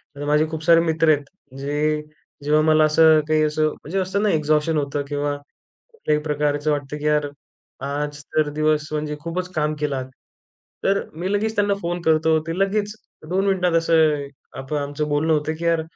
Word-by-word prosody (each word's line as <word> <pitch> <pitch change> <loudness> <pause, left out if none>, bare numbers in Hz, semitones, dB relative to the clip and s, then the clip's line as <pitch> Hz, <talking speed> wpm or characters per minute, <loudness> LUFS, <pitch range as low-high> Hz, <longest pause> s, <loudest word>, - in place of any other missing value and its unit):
आता 145 +1 -6
माझे 150 +1 +2
खूप 160 -1 -5
सारे 165 0 +6
मित्र 160 -1 +1
आहेत. 145 -1 -2 0.4
जे 150 +2 0 0.4
जेव्हा 150 +1 +3
मला 155 0 +4
असं 155 0 +5
काही 155 0 +2
असं 155 0 +1
म्हणजे 165 +5 -5
असतं 190 +2 -1
ना 210 - +3
एक्झॉशन 155 +1 +1
होतं 145 0 -1
किंवा 145 0 -1
कुठल्याही 150 - -5
प्रकारचं 150 0 0
वाटतं 145 0 -3
की 150 - -7
यार 150 -1 +2 0.6
आज 145 +1 -3
तर 155 -1 +2
दिवस 155 0 +1
म्हणजे 150 0 -2
खूपच 180 +3 -4
काम 150 0 0
केलात. 140 -3 -2 0.8
तर 195 +1 +3
मी 175 +5 -3
लगेच 220 +2 0
त्यांना 205 -1 +2
फोन 175 +1 -3
करतो. 160 -1 +3
ते 165 +2 -3
लगेच 205 +1 0 0.4
2 190 +2 +1
मिनिटात 180 -3 +1
असं 155 -3 +2 0.3
आता 145 +2 -3
आमचं 145 +1 -3
बोलणं 150 +2 +1
होतं 155 +1 0
की 170 - -4
"यार, 165 -1 +2
155 Hz, 175 wpm, -22 LUFS, 150-165 Hz, 0.8 s, सारे